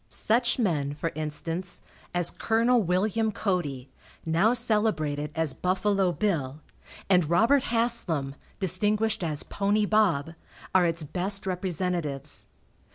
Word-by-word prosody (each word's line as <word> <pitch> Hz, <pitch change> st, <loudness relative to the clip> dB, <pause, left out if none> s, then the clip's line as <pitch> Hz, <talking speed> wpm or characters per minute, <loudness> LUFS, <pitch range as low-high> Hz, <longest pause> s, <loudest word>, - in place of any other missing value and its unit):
Such 240 Hz, +2 st, +1 dB
men, 150 Hz, -, 0 dB
for 165 Hz, +2 st, -3 dB
instance, 165 Hz, +4 st, -4 dB, 0.3 s
as 175 Hz, -1 st, +3 dB
Col. 230 Hz, +2 st, +2 dB
Wm. 210 Hz, +4 st, 0 dB
Cody, 155 Hz, -, -2 dB, 0.4 s
now 170 Hz, +7 st, +3 dB
celebrated 210 Hz, -12 st, 0 dB
as 160 Hz, -4 st, 0 dB
"Buffalo 190 Hz, +2 st, +1 dB
Bill," 155 Hz, -9 st, -2 dB, 0.5 s
and 180 Hz, -5 st, +3 dB
Robert 235 Hz, +10 st, +3 dB
Haslam, 230 Hz, -, +2 dB, 0.3 s
distinguished 210 Hz, +3 st, +1 dB
as 155 Hz, -3 st, -2 dB
"Pony 205 Hz, +1 st, 0 dB
Bob," 180 Hz, -8 st, +1 dB, 0.4 s
are 180 Hz, -2 st, +4 dB
its 165 Hz, -1 st, -1 dB
best 190 Hz, +6 st, -2 dB
representatives. 180 Hz, -6 st, -2 dB
185 Hz, 110 wpm, -27 LUFS, 160-215 Hz, 0.5 s, are